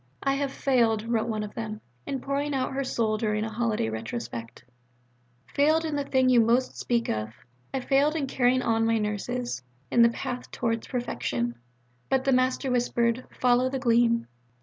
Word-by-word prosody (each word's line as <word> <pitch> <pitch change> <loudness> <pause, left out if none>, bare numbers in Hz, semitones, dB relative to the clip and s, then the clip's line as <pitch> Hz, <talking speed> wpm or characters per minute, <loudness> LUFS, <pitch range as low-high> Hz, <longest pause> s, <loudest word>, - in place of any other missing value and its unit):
"I 275 - +2
have 275 0 -1
failed," 230 -6 +2
wrote 230 -1 0
one 215 -2 -2
of 210 - -7
them, 215 -2 -5 0.3
in 270 -2 -3
pouring 280 +1 -1
out 260 0 -1
her 275 +1 -1
soul 225 -4 0
during 215 -1 0
a 220 - -4
holiday 220 - 0
retrospect, 115 +1 -6 0.9
"failed 310 +3 +3
in 310 -2 -2
the 285 - 0
thing 260 -2 +2
you 250 -2 +6
most 235 +3 +2
speak 235 -1 0
of, 110 +1 -3 0.5
failed 285 +3 +3
in 300 -4 0
carrying 255 -1 +2
on 225 0 +2
my 225 0 +2
Nurses 215 - -2 0.3
'in 240 - +5
the 235 - +7
path 245 +1 -5
towards 230 -2 -2
perfection.'" 120 - -2 0.6
"But 265 -1 +2
the 270 - +2
Master 255 +1 +2
whisper'd, 240 0 +1
'Follow 250 +1 +2
the 270 - -2
Gleam.'" 235 -2 +3
240 Hz, 170 wpm, -27 LUFS, 220-260 Hz, 0.9 s, the